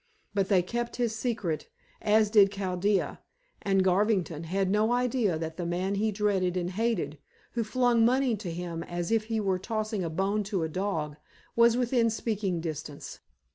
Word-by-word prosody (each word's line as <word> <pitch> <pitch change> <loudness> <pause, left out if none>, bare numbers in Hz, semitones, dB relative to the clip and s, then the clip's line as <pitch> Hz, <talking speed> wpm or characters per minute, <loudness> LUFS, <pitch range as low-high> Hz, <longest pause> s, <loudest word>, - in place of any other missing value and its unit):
But 195 -2 0
they 190 -4 +4
kept 240 +5 -3
his 235 -3 0
secret, 215 - -2 0.3
as 215 0 +3
did 200 -3 +6
Chaldea; 195 0 0 0.4
and 195 -1 +2
Garvington 185 -4 +1
had 190 +3 0
no 210 +4 +2
idea 245 -7 +1
that 160 0 -5
the 175 - -3
man 180 +3 -1
he 215 +2 +1
dreaded 195 -3 +1
and 180 0 -1
hated 220 -7 -1 0.3
who 235 - -1
flung 240 0 +2
money 255 0 +3
to 195 -3 -6
him 170 0 -4
as 175 +2 -4
if 225 -1 +2
he 225 0 -1
were 190 -3 0
tossing 215 -1 -2
a 165 - -2
bone 195 +6 0
to 195 -4 -1
a - - 0
dog 160 -5 -2 0.4
was 235 0 +5
within 240 -2 +2
speaking 210 -5 -1
distance. 155 -3 -6
200 Hz, 175 wpm, -28 LUFS, 180-225 Hz, 0.4 s, did